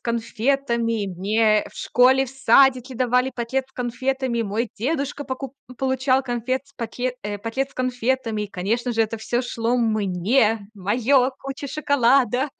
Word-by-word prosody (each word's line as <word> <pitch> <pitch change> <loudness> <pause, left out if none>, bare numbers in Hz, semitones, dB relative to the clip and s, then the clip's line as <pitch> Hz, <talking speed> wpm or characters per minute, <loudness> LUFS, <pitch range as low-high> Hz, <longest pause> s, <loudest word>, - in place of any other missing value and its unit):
конфетами. 235 -1 -1
Мне 210 +4 +2
в - - -22
школе, 260 +2 +4
в - - -10
садике 265 -1 +3
давали 250 +1 +1
пакет 255 +2 -2
с - - -30
конфетами. 250 0 -2
Мой 220 +3 -2
дедушка 285 +3 -2
поку 260 +1 -6 0.2
получал 265 0 +1
конфет 255 +1 -2
с 280 - -23
пакет 245 +2 -3
э, 205 0 -4
пакет 265 +6 -3
с - - -23
конфетами, 250 -3 -1
и, - - -3
конечно 230 +7 -1
же, 225 - +2
это 225 +1 -3
всё 240 +3 -1
шло 235 0 -1
мне, 215 0 +1
моё, 245 +7 +2
куча 275 +1 -6
шоколада, 270 -2 +2
245 Hz, 150 wpm, -23 LUFS, 225-265 Hz, 0.2 s, школе